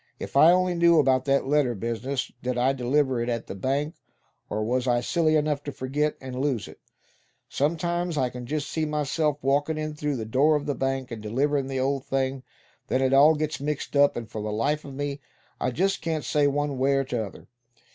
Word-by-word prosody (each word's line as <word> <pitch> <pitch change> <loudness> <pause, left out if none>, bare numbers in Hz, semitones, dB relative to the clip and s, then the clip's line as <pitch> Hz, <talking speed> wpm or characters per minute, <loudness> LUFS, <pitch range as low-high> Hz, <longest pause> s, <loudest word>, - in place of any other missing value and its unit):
"If - - -8
I 155 +5 +8
only 185 0 +2
knew 170 -1 +4
about 130 -3 +3
that 140 0 +2
letter 140 -3 +2
business. 120 +5 -3
Did 125 0 -2
I 130 +2 +3
deliver 130 0 +1
it 120 - -2
at 115 -1 -2
the - - -6
bank; 140 - -1 0.6
or 110 +1 -2
was 125 +3 0
I 120 -1 +3
silly 155 +5 +1
enough 150 -2 +1
to 145 - -3
forget, 145 +4 -1
and 130 -1 -7
lose 135 -7 -1
it? - - -13 0.7
Sometimes 170 +3 -1
I 130 -3 +1
c'n 125 -1 -8
just 150 +1 -2
see 160 - -2
myself 150 0 0
walkin' 145 +3 +1
in 155 0 -3
through 150 -1 -2
the 115 -3 -4
door 140 +7 +3
of 145 -1 -2
that 145 -2 -3
bank, 135 -1 -1
and 115 -2 -6
deliverin' 135 +6 0
the 135 -1 -3
old 135 0 0
thing; 135 -1 -1 0.5
then 130 - +1
it 130 0 +2
all 145 +4 +7
gets 155 0 -2
mixed 150 0 -3
up, 140 -2 +4
and 115 -2 -5
for 110 - -6
the 105 0 -3
life 145 +8 0
of 140 -2 -9
me 145 0 -4 0.4
I - - 0
just 190 +10 0
can't 160 -3 -2
say 145 -1 +2
one 145 -1 -1
way 135 +1 +3
or 135 0 +2
t'other. 115 -7 -5
140 Hz, 215 wpm, -26 LUFS, 130-150 Hz, 0.7 s, I